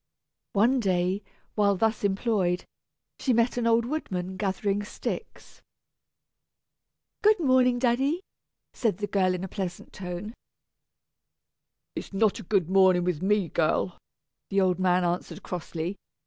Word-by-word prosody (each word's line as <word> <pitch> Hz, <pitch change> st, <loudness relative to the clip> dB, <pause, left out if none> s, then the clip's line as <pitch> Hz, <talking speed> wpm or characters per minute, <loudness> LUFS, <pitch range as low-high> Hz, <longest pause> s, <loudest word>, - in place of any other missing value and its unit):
One 235 Hz, +6 st, +4 dB
day, 185 Hz, -2 st, +1 dB, 0.3 s
while 200 Hz, -1 st, +3 dB
thus 220 Hz, +3 st, 0 dB
employed, 195 Hz, -3 st, +1 dB, 0.5 s
she 260 Hz, -, +1 dB
met 235 Hz, +1 st, +2 dB
an 240 Hz, -1 st, 0 dB
old 230 Hz, 0 st, +3 dB
woodman 190 Hz, -, -3 dB
gathering 200 Hz, +1 st, -1 dB
sticks. 205 Hz, -, -6 dB, 1.6 s
"Good 430 Hz, -1 st, +5 dB
morning, 255 Hz, -4 st, +4 dB
daddy," 265 Hz, +7 st, +1 dB, 0.5 s
said 220 Hz, -7 st, 0 dB
the 205 Hz, -, -2 dB
girl 185 Hz, -3 st, +1 dB
in 180 Hz, -, -5 dB
a -, -, -3 dB
pleasant 185 Hz, -2 st, -5 dB
tone. 185 Hz, +4 st, -6 dB, 1.6 s
"It's -, -, -6 dB
not 205 Hz, +1 st, +2 dB
a -, -, -6 dB
good 190 Hz, -2 st, +1 dB
morning 190 Hz, -1 st, +5 dB
with 175 Hz, -4 st, -1 dB
me, 200 Hz, -1 st, +2 dB
girl," 125 Hz, -, 0 dB, 0.5 s
the 195 Hz, -, +2 dB
old 185 Hz, -2 st, +2 dB
man 180 Hz, -1 st, +3 dB
answered, 175 Hz, +1 st, -2 dB
crossly. 175 Hz, +1 st, -4 dB
195 Hz, 130 wpm, -27 LUFS, 180-230 Hz, 1.6 s, Good